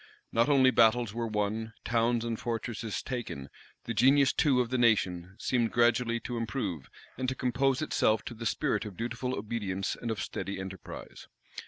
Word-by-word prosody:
Not 115 +5 +3
only 130 -2 +6
battles 115 -2 +4
were 115 0 -2
won, 110 +1 -2
towns 115 0 +1
and 115 -1 -2
fortresses 115 -1 -3
taken; 115 - -5 0.3
the 115 - -3
genius 135 +4 +5
too 140 -5 +3
of 120 -2 +1
the 130 - +1
nation 95 -6 +2
seemed 120 -1 0
gradually 120 0 +2
to 120 - -4
improve, 110 - -3 0.3
and 130 -1 0
to 130 - -3
compose 130 +3 +1
itself 110 -7 +2
to - - -5
the 115 0 -3
spirit - - 0
of 105 -4 -8
dutiful 120 +2 -2
obedience 100 -3 -2
and 120 - -5
of 110 - -2
steady 100 -1 -4
enterprise. 95 -2 -8
115 Hz, 170 wpm, -30 LUFS, 105-125 Hz, 0.3 s, only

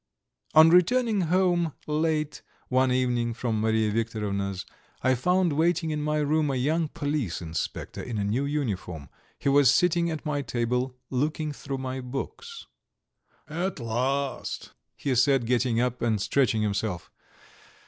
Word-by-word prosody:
VIII - - +9
On 160 - +7
returning 210 +4 +4
home 175 -3 +2
late 155 0 -1 0.3
one 130 0 +3
evening 120 -2 0
from 115 -3 -1
Mariya 110 -1 +2
Viktorovna's 100 -4 -2 0.4
I 130 +1 +4
found 180 +6 +2
waiting 165 +1 +1
in 150 -1 -2
my 150 0 0
room 150 0 +1
a 135 - 0
young 155 +6 +1
police 145 - -2
inspector 80 -2 -4
in 115 -3 -5
a 100 - 0
new 115 +8 0
uniform; 95 - -3 0.3
he - - -4
was 140 -2 +6
sitting 170 +1 +2
at 160 0 -5
my 145 -2 -1
table, 125 0 -1
looking 150 +3 -1
through 140 -1 -5
my 130 0 -4
books. 295 - -6 0.8
"At 175 +2 -3
last," 130 +4 -2 0.2
he 135 - -1
said, 125 0 +3
getting 120 -1 +1
up 125 0 -1
and 110 -3 +1
stretching 110 0 +1
himself. 100 -4 -2
135 Hz, 145 wpm, -27 LUFS, 115-155 Hz, 0.8 s, VIII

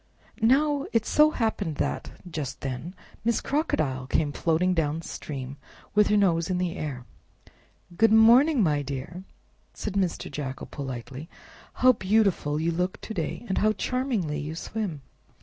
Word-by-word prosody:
Now 280 +5 +3
it 225 -1 +2
so 300 0 +5
happened 220 - -1
that, - - -3
just 150 -6 -5
then, 135 +7 -5 0.3
Miss 235 0 +2
Crocodile 150 - -1
came 145 +1 +1
floating 170 +5 +1
down 160 -1 -1
stream 135 -3 -6 0.4
with 210 0 +5
her 210 - +3
nose 170 -5 +2
in 185 - 0
the 180 -2 -1
air. 135 -5 -5 0.9
"Good 225 +4 +4
morning, 235 +5 +6
my 150 -4 +2
dear!" 140 +7 -6 0.5
said 210 - -4
Mr. 190 -3 -1
Jackal 135 -3 -5
politely; 135 +2 -7 0.4
"how 255 0 +5
beautiful 190 -9 +1
you 165 +2 +1
look 180 +2 -2
to 220 - -6
day, 175 +5 -4
and 190 - 0
how 215 0 +3
charmingly 220 - -1
you 155 +2 -5
swim! 170 -6 -4
180 Hz, 150 wpm, -26 LUFS, 150-220 Hz, 0.9 s, morning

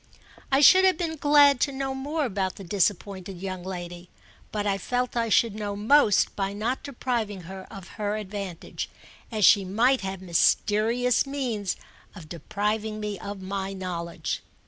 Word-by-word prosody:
I 270 +1 +4
should 375 +6 +8
have 375 -3 +4
been 325 -2 -2
glad 290 -2 +5
to 280 - +1
know 270 0 -3
more 290 +3 -2
about 195 -5 -2
the 195 - -10
disappointed 190 0 -1
young 185 -1 -5
lady, 175 -1 -7 0.4
but 210 -1 -2
I 195 -1 0
felt 250 +5 -2
I 230 -1 0
should 225 0 +3
know 205 -1 -4
most 215 0 +4
by 195 0 -2
not 225 +6 -2
depriving 240 -7 -3
her 190 +2 -9
of 195 -4 -10
her 205 0 0
advantage, 200 -4 -6 0.4
as 215 -3 +2
she 200 -3 +6
might 235 +8 +2
have 190 -1 -4
mysterious 215 +8 +2
means 240 -9 -2 0.4
of 165 -6 -11
depriving 210 +6 -2
me 210 -2 -4
of 200 0 -7
my 195 0 -3
knowledge. 175 -3 -4
205 Hz, 160 wpm, -26 LUFS, 190-250 Hz, 0.4 s, should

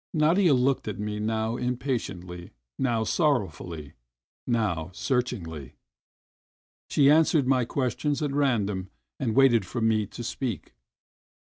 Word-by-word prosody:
Nadia 160 +1 +4
looked 130 0 +1
at 105 -3 -4
me 105 0 -3
now 110 +2 -1
impatiently, 120 -9 -3 0.3
now 120 -4 +1
sorrowfully, 90 - -1 0.5
now 100 -9 0
searchingly; 100 - -3 1.1
she 140 -2 +5
answered 155 -2 +4
my 130 -2 +2
questions 135 +3 -1
at 145 - -1
random 105 -9 0 0.3
and 120 -5 -1
waited 130 -5 +5
for 120 +6 -5
me 110 -2 +1
to 120 - -8
speak. 120 - -4
120 Hz, 115 wpm, -26 LUFS, 105-135 Hz, 1.1 s, she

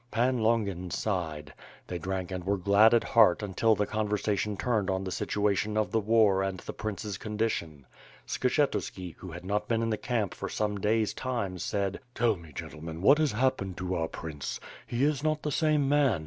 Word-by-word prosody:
Pan 120 +3 +1
Longin 105 -6 0
sighed. 80 -8 -3 0.3
They 90 - -5
drank 95 +1 -3
and 90 -1 -4
were 100 +2 0
glad 100 +4 +5
at 115 - +3
heart 110 -4 +4
until 105 +3 +2
the 105 - 0
conversation 105 -1 -1
turned 110 -5 0
on 95 0 0
the 95 - -4
situa 105 +2 0
tion 105 +3 -1
of 105 -3 +1
the 115 - +2
war 105 -3 +4
and 95 -1 -2
the - - -7
prince's 105 -2 -4
condition. 105 - -2 0.4
Skshetu§ki, 125 - -1
who 90 - -8
had 85 +2 -8
not 105 +2 -1
been 115 -1 +1
in 115 - 0
the 110 - 0
camp 110 -6 -1
for - - -5
some 105 -1 -1
days 110 +2 +1
time, 115 -8 -3
said: 100 +2 -1 0.2
"Tell 115 -2 +3
me, 85 -3 -13
gentlemen, 80 +4 -7
what 140 +8 +6
has 155 -6 +2
happened 110 -6 0
to 90 +1 -3
our 80 -2 0
Prince? 75 -5 -6 0.3
He 120 +2 -1
is 145 -1 +1
not 155 -1 0
the 150 - -1
same 150 -2 +2
man. 140 - +3
105 Hz, 195 wpm, -29 LUFS, 95-115 Hz, 0.4 s, what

